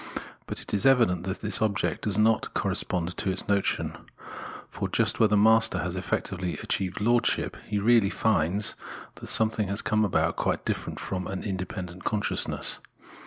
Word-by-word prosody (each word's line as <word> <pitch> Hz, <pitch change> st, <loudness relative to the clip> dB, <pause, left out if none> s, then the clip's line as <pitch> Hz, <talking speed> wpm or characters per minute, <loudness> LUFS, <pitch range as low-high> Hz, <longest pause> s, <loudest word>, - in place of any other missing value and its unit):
But -, -, -5 dB
it -, -, -9 dB
is 105 Hz, +5 st, +3 dB
evident 115 Hz, -10 st, +3 dB
that 95 Hz, +1 st, -4 dB
this 105 Hz, 0 st, +1 dB
object 105 Hz, -2 st, 0 dB
does 105 Hz, -3 st, +2 dB
not 110 Hz, +1 st, +2 dB
correspond 90 Hz, 0 st, 0 dB
to 100 Hz, -, -1 dB
its 95 Hz, 0 st, -2 dB
notion; 100 Hz, -1 st, 0 dB, 0.7 s
for, -, -, -4 dB
just -, -, +1 dB
where 110 Hz, -, +6 dB
the 105 Hz, -, +3 dB
master 110 Hz, +2 st, +4 dB
has -, -, -3 dB
effectively 90 Hz, -2 st, -3 dB
achieved 95 Hz, 0 st, -2 dB
lordship, 120 Hz, +2 st, +1 dB
he 105 Hz, -, -1 dB
really 110 Hz, -1 st, +4 dB
finds 100 Hz, -1 st, +1 dB, 0.4 s
that -, -, -11 dB
something 110 Hz, -2 st, +3 dB
has 100 Hz, +2 st, -1 dB
come 110 Hz, 0 st, +2 dB
about 85 Hz, -5 st, +1 dB
quite -, -, -1 dB
different -, -, -3 dB
from 90 Hz, -2 st, -4 dB
an 95 Hz, -, -5 dB
independent 90 Hz, -2 st, -5 dB
consciousness. 105 Hz, -1 st, 0 dB
100 Hz, 165 wpm, -27 LUFS, 95-110 Hz, 0.7 s, where